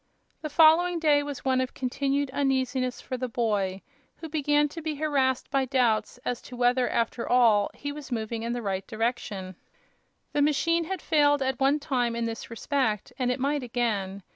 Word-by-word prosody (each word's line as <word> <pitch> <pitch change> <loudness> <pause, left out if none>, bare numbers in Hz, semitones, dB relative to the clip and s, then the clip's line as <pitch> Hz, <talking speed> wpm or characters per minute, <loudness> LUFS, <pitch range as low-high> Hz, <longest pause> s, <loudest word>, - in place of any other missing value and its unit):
The 305 - -4
following 330 +3 +5
day 300 -3 +3
was 285 -2 -6
one 260 -1 +2
of 255 - -4
continued 275 +2 -1
uneasiness 260 -2 0
for 255 - -5
the 255 +1 -3
boy, 205 -5 -1 0.3
who 320 - -9
began 295 -1 +2
to 330 +3 -8
be 310 -1 -3
harrassed 275 -4 0
by 275 -1 +2
doubts 245 -4 +1
as 245 - -2
to 250 - -10
whether, 245 +1 +2
after 235 +1 -1
all, 225 -5 +4
he 285 - -5
was 290 -2 -9
moving 225 -1 -3
in 235 +1 -2
the 240 -1 -4
right 195 -1 -3
direction. 215 -5 -3 0.8
The 290 - +2
machine 330 +3 +2
had 375 0 -5
failed 290 -2 +3
at 265 -1 -1
one 275 +2 +3
time 245 -5 -1
in 235 0 -1
this 230 0 -5
respect 230 -2 -1
and 250 -1 +1
it 250 - -2
might 285 +2 0
again. 215 -6 -2
260 Hz, 185 wpm, -27 LUFS, 235-290 Hz, 0.8 s, following